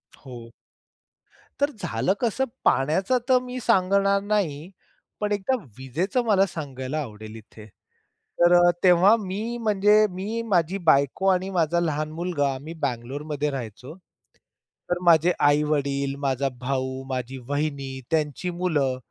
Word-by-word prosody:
हो. 120 -3 -11 1.1
तर 285 - +3
झालं 115 +12 0
कसं 245 +3 0 0.2
पाण्याचा 185 - +2
तर 255 -1 +5
मी 250 0 -6
सांगणार 200 -2 +2
नाही. 185 -7 -1 0.5
पण 210 0 -2
एकदा 205 +6 0 0.2
विजेचं 170 - -1
मला 195 -3 +4
सांगायला 145 -3 -5
आवडेल 110 -4 -9
इथे. 110 0 -13 0.7
तर 175 +1 +5
अ, - - +6
तेव्हा 185 +3 +6
मी 215 +4 -4
म्हणजे 210 0 +4
मी, 205 +6 -4
माझी 175 0 +1
बायको 140 +7 +2
आणि 190 0 +2
माझा 170 -2 +1
लहान 155 -2 -2
मुलगा 155 -4 -1
आम्ही 150 +5 -8
बेंगलोरमध्ये 145 +4 -3
राहायचो. 125 +3 -7 0.9
तर 175 0 0
माझे 170 0 +5 0.2
आई-वडील, 140 -2 +1
माझा 140 -1 -1
भाऊ, 130 0 -3
माझी 130 0 -4
वाहिनी, 145 -1 -2 0.2
त्यांची 155 +2 -1
मुलं 155 -7 0
155 Hz, 125 wpm, -24 LUFS, 135-195 Hz, 1.1 s, अ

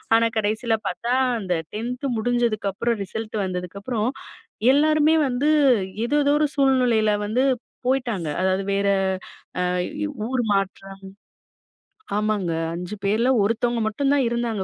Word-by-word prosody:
ஆனா 230 0 +4
கடைசில 220 +2 0
பார்த்தா, 240 +2 -2 0.3
அந்த 180 -2 -1 0.2
10த் 250 +5 -3
முடிஞ்சதுக்கு 235 -3 0
அப்புறம், 235 +2 -1
ரிசல்ட் 220 +2 -5
வந்ததுக்கப்புறம், 200 +6 -3 0.6
எல்லாருமே 310 +2 +4
வந்து, 270 +5 +1 0.6
ஏதோதோ 290 +1 +2
ஒரு 305 - +3
சூழ்நிலையில 250 -6 +3 0.2
வந்து 250 +5 +1 0.4
போயிட்டாங்க. 235 - 0
அதாவது 190 +1 +1
வேற 200 0 +1 0.7
அ - - +1 0.2
வ் 300 +7 -4 0.2
ஊர் 255 -1 0
மாற்றம் 195 0 -2 1.2
ஆமாங்க. 210 -5 0 0.2
5 180 +4 -5
பேர்ல 220 +6 +2
ஒருத்தவங்க 235 +2 0
மட்டும் 275 +6 0
தான் 280 -2 +3
இருந்தாங்க 230 -4 -1
230 Hz, 120 wpm, -23 LUFS, 200-255 Hz, 1.2 s, ஆனா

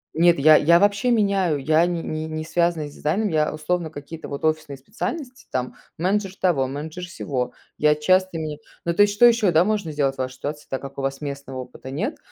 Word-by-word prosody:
Нет, 170 +1 +5
я 155 +2 +7
я 170 +3 +5
вообще 205 +5 +2
меняю, 200 -8 +2
я 155 +4 +3
не 170 -2 -2
не 155 0 -4
не 155 0 -4
связана 170 -2 0
с 145 - -12
дизайном. 195 +10 0
Я, 155 -3 +1
условно, 160 +2 -2
какие-то 155 +2 -9
вот 140 +2 -4
офисные 155 -3 -1
специальности, 255 - -6
там, 125 -1 -2 0.2
менеджер 190 +2 0
того, 150 -8 +2
менеджер 155 +6 -6
сего. 135 -7 -3 0.3
Я 150 0 +4
часто 185 +3 +2
меняю 155 -2 -4 0.3
Ну, 170 - +1
то 170 - +3
есть, 205 0 +5
что 240 - +6
ещё, 230 -5 +5
да, 165 +2 +4
можно 205 -6 -1
сделать 140 -2 0
в - - -26
вашей 130 0 -3
ситуации, 150 +3 -6
так 135 - -3
как 140 0 -8
у - - -2
вас 135 0 -2
местного 140 -2 -6
опыта 125 +1 -11
нет. 205 - -3
155 Hz, 215 wpm, -23 LUFS, 145-185 Hz, 0.3 s, я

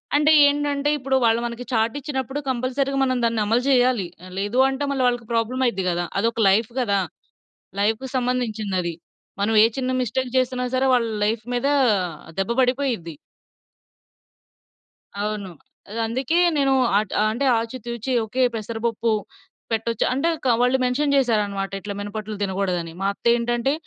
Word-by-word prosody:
అంటే 300 +1 +4 0.2
ఏంటంటే 290 0 0
ఇప్పుడు 265 -1 -1
వాళ్ళు 230 0 +3
మనకి 235 +1 -5
చార్ట్ 225 +2 +1
ఇచ్చినప్పుడు 270 -1 -3
కంపల్సరీ‌గా 260 +2 -1
మనం 255 -1 +1
దాన్ని 230 -1 +1
అమలు 230 +4 +1
జేయాలి. 250 -7 +3 0.2
ఆ! - - -10
లేదు 205 +5 -2
అంటే 270 +1 -3
మళ్ళా 270 -2 0
వాళ్ళకి 240 -2 -1
ప్రాబ్లమైద్ది 230 -3 0
గదా! 175 0 -1
అదొక 230 +2 0
లైఫ్ 215 +3 +2
గదా! 200 -6 +1 0.8
లైఫ్‌కి 225 +5 0
సంబంధించిందది. 220 -8 -1 0.5
మనం 215 +2 +1
ఏ - - +7
చిన్న 255 -1 -1
మిస్టేక్ 250 +2 -2
జేసినా 255 0 +1
సరే 265 +1 +2
వాళ్ళ 235 -2 +1 0.2
లైఫ్ 220 +2 0
మీద 245 +2 0 0.7
దెబ్బ 195 +3 -1
పడిపోయిద్ది. 250 -9 0 2.1
అవును. 210 -2 -3 0.4
అదందుకే 230 +8 -1 0.2
నేను 275 -1 +3 0.3
అట్ 210 -2 -4 0.2
అంటే 265 +5 -1
ఆచి 230 +3 -5
తూచి 235 +2 -3
ఓకే 220 +4 -2
పెసర 225 +1 -5
పప్పు 230 0 0 0.6
పెట్టొచ్చు 225 0 0
అంటే 275 +5 0 0.2
కా 255 - +3
వాళ్ళు 250 +1 +3
మెన్షన్ 280 +3 +1
చేశారన్నమాట, 210 -7 +1
ఇట్లా 205 - -5
మినపట్లు 210 +1 -5
తినగూడదని. 185 -4 -1
మా 195 - +1
అత్తెంటంటే 240 +3 +1
235 Hz, 140 wpm, -23 LUFS, 215-260 Hz, 2.1 s, ఏ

